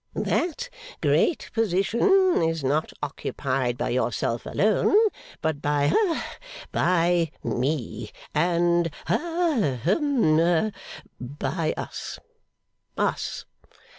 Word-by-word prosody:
That 360 Hz, +8 st, -1 dB, 0.3 s
great 335 Hz, -, +1 dB
position 235 Hz, -, +3 dB
is 165 Hz, -2 st, 0 dB
not 145 Hz, +4 st, 0 dB
occupied 130 Hz, -3 st, -2 dB
by -, -, -1 dB
yourself 120 Hz, -1 st, -1 dB
alone, 215 Hz, -, +2 dB, 0.5 s
but 155 Hz, -2 st, -1 dB
by 145 Hz, -1 st, +2 dB
ha 390 Hz, -7 st, 0 dB, 0.3 s
by 175 Hz, -2 st, +2 dB
me, 120 Hz, -5 st, -2 dB, 0.2 s
and 170 Hz, +1 st, +2 dB, 0.2 s
ha 325 Hz, -, 0 dB
hum 175 Hz, -, +3 dB, 0.5 s
by 150 Hz, +5 st, -2 dB
us. -, -, -6 dB, 0.8 s
Us. -, -, -1 dB
170 Hz, 85 wpm, -25 LUFS, 145-230 Hz, 0.8 s, position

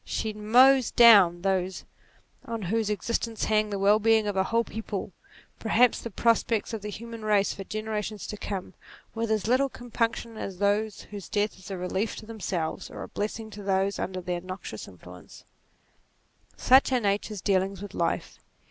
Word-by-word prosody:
She 220 Hz, -1 st, -3 dB
mows 245 Hz, +4 st, +5 dB
down 195 Hz, -7 st, +7 dB
those 190 Hz, -1 st, -1 dB, 0.6 s
on 230 Hz, -2 st, -5 dB
whose 215 Hz, +4 st, 0 dB
existence 225 Hz, +2 st, -2 dB
hangs 215 Hz, -1 st, +2 dB
the 200 Hz, -, -3 dB
well 200 Hz, +2 st, +4 dB
being 220 Hz, 0 st, +3 dB
of 205 Hz, -1 st, -2 dB
a 190 Hz, 0 st, +2 dB
whole 230 Hz, +2 st, +1 dB
people, 210 Hz, -3 st, -5 dB, 0.5 s
perhaps 235 Hz, +2 st, +3 dB
the 235 Hz, -, -5 dB
prospects 230 Hz, +1 st, +1 dB
of 220 Hz, -, -4 dB
the 210 Hz, -, -5 dB
human 230 Hz, +1 st, -8 dB
race 210 Hz, -2 st, +2 dB
for 195 Hz, -, -7 dB
generations 215 Hz, -1 st, -4 dB
to -, -, -5 dB
come, 195 Hz, -2 st, -5 dB, 0.4 s
with 230 Hz, 0 st, -2 dB
as 215 Hz, -3 st, 0 dB
little 260 Hz, +4 st, +2 dB
compunc 235 Hz, -2 st, -2 dB
tion 230 Hz, -1 st, -9 dB
as 195 Hz, -3 st, -6 dB
those 205 Hz, +1 st, 0 dB
whose 205 Hz, -3 st, -9 dB
death 205 Hz, -2 st, -1 dB
is 190 Hz, -, -12 dB
a 195 Hz, -, -4 dB
relief 190 Hz, +4 st, -2 dB
to -, -, -9 dB
themselves, 190 Hz, -7 st, -4 dB
or -, -, -7 dB
a -, -, -7 dB
blessing 220 Hz, +1 st, -4 dB
to 210 Hz, -, -9 dB
those 195 Hz, 0 st, 0 dB
under 185 Hz, 0 st, -3 dB
their 175 Hz, 0 st, -3 dB
noxious 185 Hz, -, -7 dB
influence. 90 Hz, 0 st, -14 dB, 1.1 s
30 -, -, -32 dB
NATURE -, -, -11 dB
Such 265 Hz, +1 st, +6 dB
are 255 Hz, -, +3 dB
Nature's 205 Hz, -1 st, -1 dB
dealings 195 Hz, 0 st, 0 dB
with 205 Hz, -, -8 dB
life. -, -, -2 dB
210 Hz, 185 wpm, -27 LUFS, 195-225 Hz, 1.1 s, down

